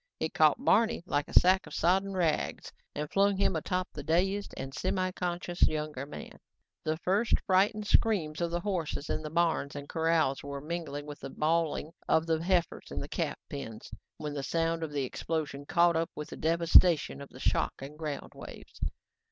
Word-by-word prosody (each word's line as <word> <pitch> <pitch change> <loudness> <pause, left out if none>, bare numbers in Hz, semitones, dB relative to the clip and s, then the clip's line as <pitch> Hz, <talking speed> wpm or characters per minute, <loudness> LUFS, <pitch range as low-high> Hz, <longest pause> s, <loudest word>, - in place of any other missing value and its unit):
It - - -2
caught - - +3
Barney 225 -6 +3
like 145 -5 0
a - - +7
sack 185 +2 +3
of - - -8
sodden 190 +3 +2
rags 170 -4 -1 0.2
and 150 +1 -2
flung 200 0 +3
him 190 -2 +2
atop 180 +3 -1
the 150 - -6
dazed 190 +7 0
and 135 0 -5
semiconscious 180 +2 0
younger 150 -3 -3
man. 150 - -9 0.4
The 155 0 -1
first 200 +7 +2
frightened 205 +3 +3
screams 180 -9 +2
of 170 - +1
the 175 +1 -2
horses 170 -6 -2
in - - -1
the 155 - -5
barns 165 -3 +1
and 145 0 -6
corrals 160 -4 +1
were 140 0 -5
mingling 150 -1 -5
with 145 -1 -8
the - - -7
bawling 160 +1 0 0.2
of 160 - +3
the 160 -1 0
heifers 180 -1 0
in - - -4
the - - -5
calf - - -2
pens 115 -6 -7 0.3
when 150 -1 -5
the 145 - -3
sound 165 +3 0
of 160 -2 -3
the 145 -2 -1
explosion 145 +1 -3
caught 170 0 +4
up 165 0 0
with 150 - -6
the - - -7
devastation 165 -2 +4
of 140 - -9
the 130 - -13
shock - - +1
and 145 +3 -10
ground 150 -3 -4
waves. - - -12
165 Hz, 185 wpm, -30 LUFS, 150-180 Hz, 0.4 s, a